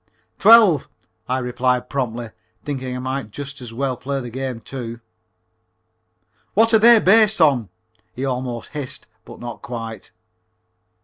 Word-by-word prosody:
"Twelve," 210 - +6 0.4
I 130 - +1
replied 125 0 -1
promptly, 120 -4 -3 0.3
thinking 130 -3 -4
I - - -4
might 130 -2 -4
just 140 +4 -8
as 120 -2 -8
well 130 +2 -2
play 135 +3 -4
the 120 -2 -7
game, 130 -1 -4
too. 115 0 -7 1.6
"What 225 +3 +4
are 220 - +7
they 235 +1 +8
based 215 +1 +4
on?" 135 - +3 0.4
he 130 - -5
almost 125 -2 -4
hissed, 145 -4 -6 0.2
but - - -12
not 120 0 -8
quite. 115 -2 -7
130 Hz, 135 wpm, -21 LUFS, 120-145 Hz, 1.6 s, they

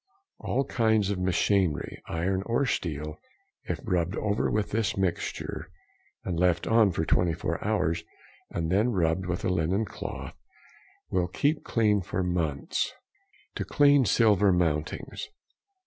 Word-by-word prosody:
All 135 +3 0
kinds 110 -5 +2
of 100 - -2
machinery, 95 -2 +1
iron 95 +3 -1
or 120 +4 +1
steel, 75 - -3 0.5
if - - -3
rubbed 90 +1 0
over 105 -2 0
with 105 -1 -1
this 110 -2 0
mixture, 95 -3 -2 0.5
and 85 -3 -2
left 90 -1 +2
on 115 -2 +5
for 80 -1 -1
24 85 0 0
hours, 95 -6 0 0.5
and 80 0 -2
then 105 +6 +3
rubbed 90 -3 0
with 90 +1 -2
a - - +2
linen 90 +4 +1
cloth, 90 - -6 0.8
will 90 -1 +1
keep 145 - 0
clean 105 -3 +2
for 90 +1 -2
months. 85 -6 -1 0.7
_To - - -1
clean 145 -1 +5
silver 105 -4 +4
mountings. 80 -3 -1
95 Hz, 130 wpm, -28 LUFS, 85-110 Hz, 0.8 s, on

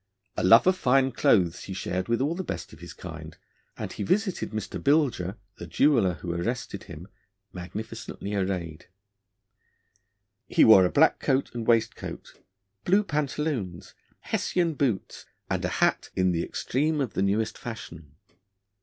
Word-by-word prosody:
A - - -2
love 105 +6 +7
of 185 0 +4
fine 135 -4 +3
clothes 90 -8 +2
he 95 - -6
shared 95 0 -3
with 115 +1 0
all 145 +4 +1
the 190 +2 -4
best - - -6
of 80 - -14
his 85 0 -10
kind, 80 -2 -9 0.4
and - - -5
he - - -7
visited 190 - 0
Mr 110 -1 -5
Bilger 135 - +1 0.2
the 85 - -8
jeweller 110 - +3
who 85 -1 -5
arrested 100 +2 -4
him 85 +2 -10 0.5
magnificently 100 +2 -7
arrayed. 90 -5 -3 1.6
He - - +4
wore 95 -5 +8
a 90 - 0
black 160 +3 +4
coat 135 -1 0
and 115 -2 -5
waistcoat, 115 -2 -1 0.4
blue 195 +3 +3
pantaloons, 145 - -3 0.3
Hessian 170 -3 0
boots, 130 -9 -2 0.2
and - - -1
a - - +1
hat - - +1
'in 95 -1 +2
the 85 -1 0
extreme 150 +4 -1
of 125 -9 -2
the - - -1
newest 105 +3 0
fashion.' 80 -10 -9
110 Hz, 150 wpm, -26 LUFS, 90-140 Hz, 1.6 s, wore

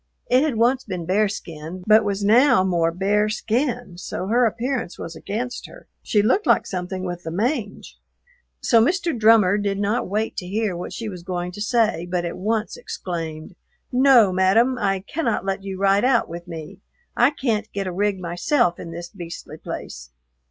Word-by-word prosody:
It 255 +1 +5
had 300 -4 0
once 245 +4 +2
been 180 -5 -5
bearskin, 180 -3 -2
but 215 +1 +6
was 200 -1 -2
now 225 -1 +5
more 170 -3 +1
bare 205 +4 +1
skin, 230 -3 -2
so 185 - -5
her 235 +4 +3
appearance 235 -3 -3
was 165 - -7
against 225 +9 -5
her; - - -14 0.2
she 205 -2 +1
looked 380 - +2
like - - +4
something 185 0 -4
with 175 -1 -4
the 165 - -6
mange. 215 - -3 0.6
So 230 -2 +4
Mr. 340 +2 0
Drummer 215 -3 +5
did 200 -1 -1
not 205 +4 0
wait 215 +4 -2
to 180 - -4
hear 205 -1 -1
what 175 - -6
she 230 - -5
was 180 -4 -7
going 180 0 -4
to 205 - -9
say 215 -6 +1
but 175 -1 -1
at 170 - -4
once 220 - -2
exclaimed, 165 - -6 0.4
"No, 250 -5 +6
madam, 195 +8 +3
I 195 -2 0
cannot 230 - -2
let 195 0 -2
you 195 -1 -5
ride 195 +2 +3
out 250 -2 +3
with 170 +1 -8
me. 165 +3 -8 0.4
I 245 +2 +5
can't 225 -7 -2
get 200 -1 -3
a 185 - -3
rig 200 +1 0
myself 175 - 0
in 170 - -7
this 170 +1 -7
beastly 170 -4 -9
place." - - -7
200 Hz, 180 wpm, -22 LUFS, 180-230 Hz, 0.6 s, but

